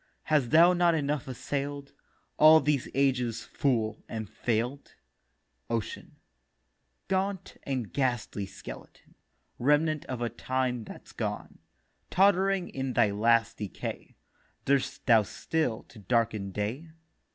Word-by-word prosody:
Hast 150 Hz, -6 st, +2 dB
thou 170 Hz, +6 st, +7 dB
not 175 Hz, -1 st, +3 dB
enough 145 Hz, -3 st, -1 dB
assail'd, 140 Hz, +2 st, -4 dB, 0.4 s
All 155 Hz, +1 st, +8 dB
these 150 Hz, -4 st, 0 dB
ages, 125 Hz, -4 st, +1 dB
Fool, 115 Hz, -6 st, -1 dB
and 110 Hz, -2 st, -4 dB
fail'd?' 120 Hz, +6 st, -2 dB, 0.7 s
OCEAN: 115 Hz, -2 st, -4 dB, 0.9 s
'Gaunt 190 Hz, -1 st, -2 dB
and 130 Hz, -6 st, -3 dB
ghastly 120 Hz, -7 st, -1 dB
Skeleton, 95 Hz, -, -11 dB, 0.5 s
Remnant 150 Hz, +3 st, +2 dB
of 130 Hz, -2 st, -5 dB
a 120 Hz, -, 0 dB
time 125 Hz, 0 st, -2 dB
that's -, -, -11 dB
gone, -, -, -5 dB, 0.5 s
Tott'ring 195 Hz, -1 st, +3 dB
in 135 Hz, -1 st, -3 dB
thy 105 Hz, -, +3 dB
last 115 Hz, +2 st, +2 dB
decay 105 Hz, -3 st, -6 dB, 0.5 s
Durst 140 Hz, -1 st, 0 dB
thou 115 Hz, -3 st, +6 dB
still 125 Hz, +3 st, -2 dB
to 115 Hz, -, -16 dB
darken 110 Hz, -1 st, 0 dB
day? 110 Hz, -, -4 dB
130 Hz, 115 wpm, -29 LUFS, 115-150 Hz, 0.9 s, All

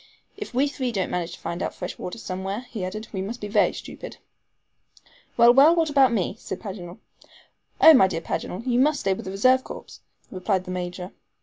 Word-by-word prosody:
"If 420 Hz, -, -7 dB
we 260 Hz, +4 st, +2 dB
three 265 Hz, -3 st, -3 dB
don't 195 Hz, -5 st, -2 dB
manage 175 Hz, -1 st, -3 dB
to -, -, -11 dB
find 170 Hz, +2 st, -5 dB
out -, -, -3 dB
fresh 180 Hz, -, -6 dB
water 180 Hz, -, -6 dB
somewhere," 195 Hz, +1 st, -4 dB
he 215 Hz, -5 st, -5 dB
added, 215 Hz, +4 st, -5 dB
"we 190 Hz, -, -3 dB
must 225 Hz, +6 st, -5 dB
be 210 Hz, -, -5 dB
very 205 Hz, 0 st, +3 dB
stupid." -, -, -9 dB, 1.2 s
"Well, 235 Hz, 0 st, +7 dB
well, 275 Hz, +3 st, +7 dB
and 335 Hz, +1 st, +4 dB
what 325 Hz, -2 st, +1 dB
about 275 Hz, -2 st, +5 dB
me?" 200 Hz, -4 st, -1 dB
said 185 Hz, -, -6 dB
Paganel. 185 Hz, -4 st, -8 dB, 0.8 s
"Oh, 320 Hz, -, +9 dB
my 225 Hz, -9 st, +6 dB
dear 165 Hz, -3 st, -4 dB
Paganel, 180 Hz, +7 st, -4 dB
you 245 Hz, -1 st, +1 dB
must 290 Hz, +2 st, +2 dB
stay 195 Hz, -, +1 dB
with -, -, -7 dB
the 190 Hz, -, -5 dB
reserve 255 Hz, +7 st, +3 dB
corps," -, -, -10 dB, 0.3 s
replied 185 Hz, 0 st, -1 dB
the 185 Hz, -, -7 dB
Major. 180 Hz, +1 st, -5 dB
200 Hz, 210 wpm, -24 LUFS, 185-255 Hz, 1.2 s, Oh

